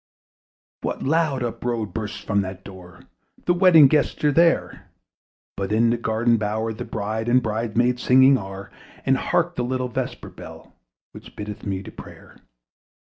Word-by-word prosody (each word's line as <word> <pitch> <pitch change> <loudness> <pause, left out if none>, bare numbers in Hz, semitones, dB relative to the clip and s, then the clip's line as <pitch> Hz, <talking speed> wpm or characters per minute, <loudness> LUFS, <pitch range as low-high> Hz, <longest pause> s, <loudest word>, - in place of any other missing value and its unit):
What - - -4
loud 150 -3 +1
uproar 120 -1 -3
bursts 105 0 -6
from 100 -1 0
that 95 0 -7
door! 90 -2 -13 0.4
The 175 - +3
wedding 175 -5 +7
guests 150 +1 0
are 150 - +4
there: 165 +3 +1 0.7
But 100 0 -4
in 115 +2 +3
the 120 - 0
garden 115 +1 +1
bower 110 +1 -2
the 120 +3 -7
bride 110 0 -3
And 125 +1 +5
bride 110 0 -3
maids 125 +1 +2
singing 130 +2 +6
are: 95 -3 -7 0.3
And 135 - +3
hark 175 +6 0
the 125 - 0
little 125 0 -2
vesper 115 - -5
bell, - - -12 0.4
Which - - -13
biddeth 105 0 -7
me 95 -1 -3
to - - -10
prayer! - - -13
115 Hz, 160 wpm, -23 LUFS, 105-130 Hz, 0.7 s, wedding